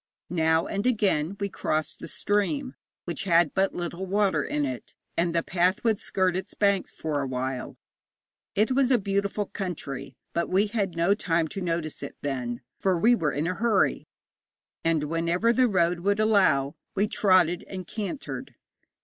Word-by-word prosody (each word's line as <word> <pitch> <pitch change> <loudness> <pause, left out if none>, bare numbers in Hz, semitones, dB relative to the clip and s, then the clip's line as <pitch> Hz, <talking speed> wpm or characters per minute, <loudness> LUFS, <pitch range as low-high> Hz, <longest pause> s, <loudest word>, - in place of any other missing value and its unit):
Now 160 -1 +2
and 200 +4 -1
again 200 -7 +1
we 200 - 0
crossed 155 -4 -2
the - - -7
stream, 255 +7 -1 0.3
which 175 - -3
had 170 -4 +4
but 195 0 +1
little 175 +2 -4
water 195 -5 +2
in 145 0 -1
it, 130 -3 -6 0.2
and 170 0 +1
the 165 - +2
path 180 +2 +1
would 220 -3 +2
skirt 185 -2 +1
its 190 - -5
banks 200 -2 +2
for 150 -2 -2
awhile. 130 -1 -3 0.8
It 215 +5 +2
was 260 -1 +4
beautiful 200 0 -1
country, 140 -10 -5 0.2
but 170 - -1
we 190 +3 +3
had 200 -5 -2
no 170 +4 +4
time 165 -5 0
to 195 - -5
notice 165 -3 -2
it 140 - -6
then, 125 -3 -3 0.2
for 190 -4 +2
we 225 +8 +5
were 165 -10 +1
in 145 +3 -1
a 180 - 0
hurry, 195 - +1 0.8
and 165 -2 +2
whenever 170 +8 +1
the 255 +1 +4
road 175 -4 +2
would 200 +4 +1
allow 185 -11 +3 0.2
we 200 +1 +3
trotted 185 -5 +3
and 185 -2 -6
cantered. 215 - -5
180 Hz, 165 wpm, -27 LUFS, 160-200 Hz, 0.8 s, we